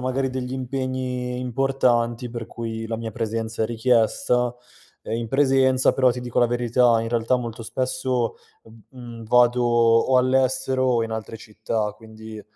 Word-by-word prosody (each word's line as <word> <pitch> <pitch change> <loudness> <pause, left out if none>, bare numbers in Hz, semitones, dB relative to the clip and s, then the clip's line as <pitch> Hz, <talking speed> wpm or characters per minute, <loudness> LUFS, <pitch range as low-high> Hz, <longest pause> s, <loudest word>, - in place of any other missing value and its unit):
magari 130 +1 -1
degli 130 0 -4
impegni 130 -1 -3
importanti 125 -2 0
per 115 -1 -6
cui 115 -1 -6
la 115 0 -3
mia 115 0 -5
presenza 115 0 -3
è - - +1
richiesta, 120 +1 +1 0.5
ehm, - - -4
in 115 -1 -4
presenza, 130 -1 +3
però 130 -1 +3
ti 125 0 -4
dico 120 -1 -3
la 120 - +5
verità, 120 -1 +2
in 115 - -4
realtà 120 +1 +1
molto 115 -2 -6
spesso 130 0 -2 0.3
v 110 - -18 0.2
mhmm, 120 -2 -9
vado 125 +2 +3
o 120 +1 +3
all'estero 130 0 +1
o 120 -2 +2
in 115 - -7
altre 110 0 -5
città, 110 0 -3
quindi, 110 0 -11
120 Hz, 160 wpm, -23 LUFS, 115-130 Hz, 0.5 s, la